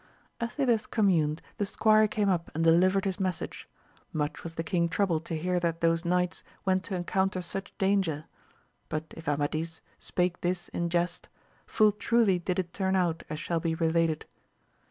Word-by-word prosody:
As 235 0 -3
they 280 - +1
thus 230 -3 +2
communed 165 -8 +2
the 205 - 0
squire 215 +1 +4
came 210 -1 0
up 175 -3 +1
and 165 - +1
delivered 185 +4 +4
his 190 -2 -1
message: 185 -4 -3 0.4
much 150 -1 -2
was 165 -1 -7
the 165 - -2
king 170 0 +1
troubled 165 -3 0
to 165 - -3
hear 180 +3 0
that 170 -1 -1
those 165 +1 +2
knights 180 +1 0 0.2
went 185 0 +2
to 190 - -2
encounter 190 +1 0
such 195 +2 -6
danger; 190 -6 +1 0.6
but 155 +1 -4
if 165 - -11
Amadis 155 +3 -1 0.2
spake 180 0 -1
this 175 0 -1
in 170 0 -2
jest, 175 0 -1 0.4
full 215 -1 +4
truly 210 -2 +2
did 180 +1 -2
it 175 -2 -2
turn 190 -1 0
out, 175 -3 +1
as 155 - -4
shall 170 +1 -1
be 165 0 -1
related. 165 -1 +1
175 Hz, 175 wpm, -29 LUFS, 165-190 Hz, 0.6 s, squire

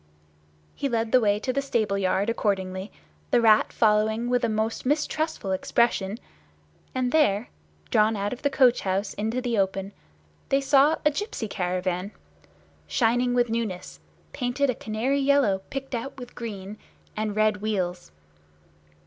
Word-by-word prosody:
He 280 - -2
led 230 -2 -1
the 255 - +6
way 205 -3 +2
to 255 +3 -2
the 275 - 0
stable 230 -7 0
yard 195 +1 +1
accordingly, 190 -3 -1 0.4
the 245 - +4
Rat 220 -2 +4
following 220 +2 +2
with 245 -1 +2
a 235 - +2
most 220 +1 -1
mistrustful 295 -5 -1
expression; 200 +1 +1 0.8
and 255 -1 0
there, 225 -8 +2 0.4
drawn 220 -2 +3
out 200 +2 -2
of 250 - -9
the 285 - +2
coach 255 -3 +4
house 195 +1 -1
into 220 +4 -2
the 240 -4 0
open, 195 0 -1 0.6
they 275 - +3
saw 280 +3 +4
a 300 - +5
gipsy 300 - -4
caravan, 180 -1 -2 0.8
shining 245 +1 +2
with 240 -2 +2
newness, 225 -6 -3 0.3
painted 255 +1 0
a - - -3
canary 230 +6 -1
yellow 275 -9 +3
picked 270 0 -6
out 250 +4 -4
with 245 -2 -9
green, 210 -3 -7 0.4
and 215 -1 -2
red 215 -1 +2
wheels. 185 - -3
225 Hz, 150 wpm, -25 LUFS, 200-250 Hz, 0.8 s, the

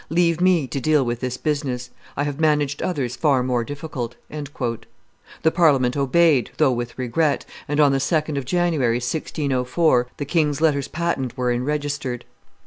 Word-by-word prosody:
Leave 170 0 +2
me 180 -5 +4
to 135 - -4
deal 150 -1 +3
with 120 0 -2
this 125 0 -3
business. 135 -5 -2 0.3
I 145 - +1
have 145 0 -3
managed 150 -2 +1
others 130 -8 -2
far 135 -3 +2
more 125 -2 0
difficult." 140 -3 -5 1.3
The 160 - +4
Parliament 135 -8 +3
obeyed, 140 0 +3
though 150 -4 +4
with 120 -1 -4
regret, 140 +4 0 0.2
and 145 +1 -1
on 145 -2 +6
the 135 - +1
2d 155 +1 0
of 140 -2 -2
January, 155 -6 +1
1604, 130 0 0
the 145 - -3
king's 150 -1 +1
letters 145 -4 +2
patent 145 -7 -2
were 125 -1 +1
enregistered. 140 0 -2
140 Hz, 155 wpm, -22 LUFS, 125-155 Hz, 1.3 s, on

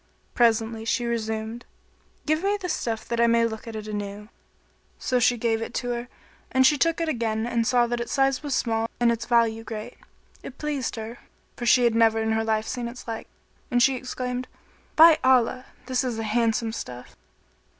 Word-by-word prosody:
Presently, 225 -1 +2
she 240 +2 0
resumed, 225 0 -3 0.6
"Give 310 +2 +1
me 405 +1 +1
the 365 -2 -4
stuff 225 -8 -2
that 235 0 0
I 235 - +5
may 230 0 +4
look 220 0 -5
at 225 - -6
it 215 0 -6
anew." 205 0 -5 0.7
So 250 -1 0
she 245 0 +3
gave 225 -1 0
it 225 - -4
her 245 0 -3 0.4
and 260 0 +4
she 295 - +6
took 330 +3 +1
it 330 - -1
again 225 -6 -1
and 235 -1 0
saw 245 -1 +4
that 240 0 -2
its 235 - -4
size 270 -1 +2
was 290 -3 -2
small 225 -1 0
and 240 -1 +4
its 230 0 -3
value 230 -2 +2
great. 215 -1 -7 0.4
It 270 - -10
pleased 290 -5 -3
her, 225 +1 -7 0.4
for 240 - -4
she 250 +1 +5
had 235 -1 +3
never 225 -1 +4
in 220 0 0
her 220 0 +1
life 220 -1 0
seen 245 -2 -3
its 240 +1 -10
like, 225 -1 -5 0.4
and 245 -1 +3
she 270 +1 +4
exclaimed, 250 0 -4 0.5
"By 320 0 +8
Allah, 255 0 +3 0.2
this 255 +1 0
is 245 -3 -2
a 225 - -3
handsome 225 +1 +1
stuff!" 125 - -8
235 Hz, 195 wpm, -25 LUFS, 225-255 Hz, 0.7 s, By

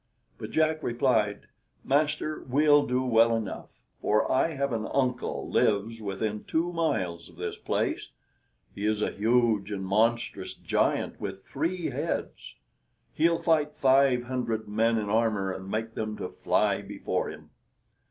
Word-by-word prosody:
But - - -6
Jack 155 0 +1
replied, 115 -5 +1 0.4
"Master, 150 +2 0
we'll 145 +2 +4
do 125 +1 +1
well 115 -2 +4
enough, 110 -4 -6 0.2
for 105 +1 +2
I 155 +4 +2
have 140 -2 -1
an 110 -1 -2
uncle 125 -3 -1
lives 110 +2 +1
within 105 +1 -3
two 170 +2 -1
miles 90 - -1
of - - -17
this - - -5
place; - - -1 0.6
he 100 - -7
is 105 0 +1
a - - 0
huge 110 -2 +2
and 95 -2 -3
monstrous 110 -1 0
giant - - 0
with 95 - -5
three 170 +5 -2
heads; - - -4 0.6
he'll 165 +2 +3
fight 155 -3 +1
five 130 -2 +4
hundred 120 -3 -2
men 115 +2 +2
in 105 -2 -2
armor, 105 -3 +1
and 95 +1 -8
make 110 +2 -3
them 110 -1 -4
to - - -4
fly - - +1
before - - -3
him." - - -11
115 Hz, 145 wpm, -28 LUFS, 105-140 Hz, 0.6 s, we'll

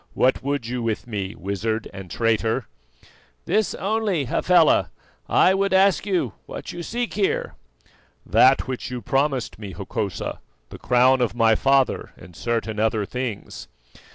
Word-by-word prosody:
"What 130 -1 +2
would 140 -2 -2
you 125 +1 -3
with 115 -2 -2
me, 100 -4 -4
wizard 105 +4 -3
and 95 -2 -9
traitor?" 115 +2 0 0.8
"This 215 -1 +1
only, 200 -6 0
Hafela: 165 +6 +3 0.4
I 185 - +5
would 195 0 0
ask 195 +1 +3
you 185 -3 0
what - - -7
you 175 - -6
seek 240 +6 -3
here?" 460 +5 0 0.7
"That 130 +1 +4
which 130 -2 -4
you 125 -1 -6
promised 135 -5 0
me, 100 -3 -7
Hokosa, 100 +1 -4 0.3
the - - -10
crown 125 +1 +4
of 120 -1 0
my 115 -1 +4
father 135 +3 +1
and 90 - -14
certain 115 -1 -2
other 110 -1 +1
things." 125 -2 -5
125 Hz, 145 wpm, -23 LUFS, 110-170 Hz, 0.8 s, I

